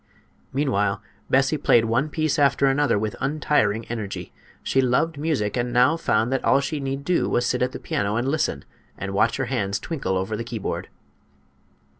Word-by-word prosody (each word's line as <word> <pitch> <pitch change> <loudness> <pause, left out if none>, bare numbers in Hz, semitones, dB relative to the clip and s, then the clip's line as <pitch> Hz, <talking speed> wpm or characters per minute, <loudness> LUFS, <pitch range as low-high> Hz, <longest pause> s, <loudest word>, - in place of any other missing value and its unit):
Meanwhile 105 -8 0 0.3
Bessie 135 +3 +2
played 120 -4 +4
one 125 +7 +1
piece 155 -1 0
after 140 -1 +3
another 140 -2 +2
with 105 0 -2
untiring 135 -7 +1
energy. 110 -4 -5 0.3
She 135 - +2
loved 140 +5 +1
music, 145 -10 -1
and 120 0 -1
now 125 +6 +4
found 115 -7 +1
that 135 - -1
all 135 - +4
she 140 +2 -3
need 135 0 -3
do 180 - +1
was 120 - +1
to - - 0
sit 125 - -2
at 125 0 +1
the - - -6
piano 100 +1 -1
and 120 +3 0
listen 135 - -1 0.3
and 100 0 -5
watch 100 - +2
her 135 - -1
hands 100 -6 -1
twinkle 135 - -2
over 95 +4 -2
the 115 - -4
keyboard. 115 -3 -4
125 Hz, 185 wpm, -24 LUFS, 110-140 Hz, 0.3 s, played